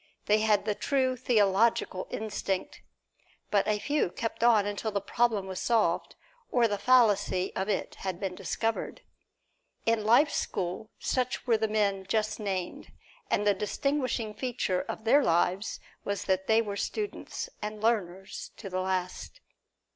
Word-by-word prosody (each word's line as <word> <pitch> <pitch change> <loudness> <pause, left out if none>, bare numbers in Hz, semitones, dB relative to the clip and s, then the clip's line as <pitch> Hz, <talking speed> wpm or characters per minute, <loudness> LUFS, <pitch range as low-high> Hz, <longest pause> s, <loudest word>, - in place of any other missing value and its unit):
They 210 +1 +4
had 210 -2 +2
the 215 - +1
true 260 +2 +1
theological 215 -4 +2
instinct. 200 -3 -3 0.7
But 205 -1 +3
a 210 -1 +2
few 290 -1 0
kept 225 +4 -4
on 225 -4 +5
until 205 +2 -2
the 205 -1 -1
problem 220 0 +1
was 190 -1 -5
solved, 220 -8 +1 0.4
or 240 -2 +4
the 205 -2 -2
fallacy 205 -6 +3
of 190 +2 -2
it 200 - -2
had 185 -2 -3
been 190 -2 -3
discovered. 225 - -2 0.8
In 230 -1 +2
life's 240 +8 +4
school 185 +4 -3
such 255 -1 -1
were 235 - +4
the 220 0 +1
men 200 -3 0
just 215 0 0
named, 190 -4 -4 0.4
and 210 - +1
the 205 - +5
distinguishing 240 +2 -1
feature 230 -7 -1
of - - -6
their 275 +6 +5
lives 180 +3 +1 0.2
was 200 -1 -2
that 190 0 0
they 225 +1 +4
were 205 -2 -4
students 425 - -4
and 210 0 -4
learners 195 -4 -1
to 195 -4 -8
the 185 0 -1
last. 185 - -3
210 Hz, 150 wpm, -29 LUFS, 195-230 Hz, 0.8 s, on